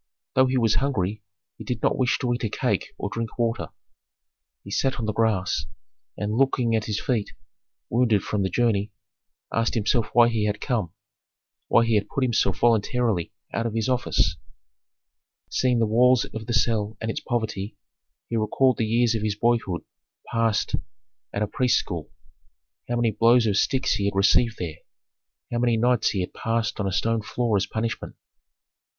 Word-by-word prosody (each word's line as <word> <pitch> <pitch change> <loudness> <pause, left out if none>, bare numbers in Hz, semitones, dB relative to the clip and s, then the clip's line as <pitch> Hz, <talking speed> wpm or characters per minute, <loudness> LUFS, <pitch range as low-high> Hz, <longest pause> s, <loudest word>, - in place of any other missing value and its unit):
Though 130 0 +4
he 130 0 0
was 115 -3 +3
hungry, 110 -7 -1 0.4
he - - -7
did 120 -3 -4
not - - +3
wish 125 -2 +1
to 125 -1 -1
eat 120 - -4
a 110 - 0
cake - - -1
or - - -3
drink 115 +3 -5
water. 115 -1 0 1.0
He 100 - -10
sat 135 +5 +1
on 115 - -2
the 110 - -1
grass, 105 -4 0 0.5
and 105 0 -2
looking 125 -2 +2
at 110 -1 0
his 105 -1 -2
feet 120 -7 -1 0.5
wounded 115 -4 +2
from 105 - -1
the 95 - 0
journey, 105 0 +1 0.6
asked 115 +1 +1
himself 110 +1 +1
why 120 -1 +6
he 110 -3 0
had 105 0 -2
come, 110 - -1 0.8
why 115 - +4
he 115 - +1
had 105 -1 +2
put 135 - -1
himself 115 -6 +1
voluntarily 115 -4 +2 0.2
out 115 0 0
of 115 - -5
his 115 -1 0
office. 120 -10 +1 1.1
Seeing 125 -2 +2
the 115 - +3
walls 125 +2 +4
of 110 -1 -6
the 120 - -1
cell 110 -2 +1
and 110 0 -2
its - - -4
poverty, 110 -4 -3 0.5
he 115 - -2
recalled 125 +4 +2
the 110 - 0
years 120 +1 +2
of 110 - -1
his 105 -1 -1
boyhood 110 -6 0 0.5
passed 115 -2 +1 0.6
at 105 - -1
a - - -1
priests' 125 +3 +2
school. 85 -5 -4 0.8
How 120 - 0
many 120 -1 +2
blows 115 +3 +4
of 105 -3 +1
sticks 130 +5 +2
he 100 -1 -1
had 100 - -1
received 105 +3 +3
there, 80 -4 -5 0.7
how 120 - -1
many 120 -1 +2
nights 120 +1 +2
he 95 - -1
had 90 - -5
passed 115 -1 -1
on 100 - 0
a - - -1
stone 110 +3 0
floor 115 +1 -1
as 100 - +1
punishment! 115 +1 -4
115 Hz, 180 wpm, -25 LUFS, 105-120 Hz, 1.1 s, why